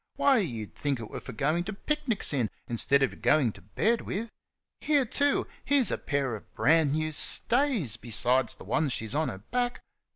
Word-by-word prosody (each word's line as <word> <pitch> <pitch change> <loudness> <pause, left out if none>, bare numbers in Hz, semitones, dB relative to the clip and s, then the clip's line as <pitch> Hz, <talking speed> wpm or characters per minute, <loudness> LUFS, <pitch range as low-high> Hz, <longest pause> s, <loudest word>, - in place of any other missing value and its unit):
Why, 270 -4 +3
you'd 115 - -4
think 140 -2 -2
't 115 - -7
were - - -5
for - - -9
goin' 155 +9 0
to 215 - -5
picnics 265 - -1
in, 125 -6 0 0.3
'stead 140 +4 +3
o' - - +4
goin' 140 -7 +1
to 100 - -16
bed 215 - 0
with. 220 +4 -5 0.5
Here, 290 -3 +2
too! 280 +4 +2 0.2
here's 280 -5 +3
a - - -1
pair 140 -4 -2
of 105 - -13
brand 155 -2 +3
new 155 0 -1
stays, 230 - +3
besides 120 +2 +1
the - - -13
ones 130 - -1
she's 110 0 -4
on 155 +2 0
her 95 - -6
back. 245 0 -1
155 Hz, 190 wpm, -28 LUFS, -, 0.5 s, o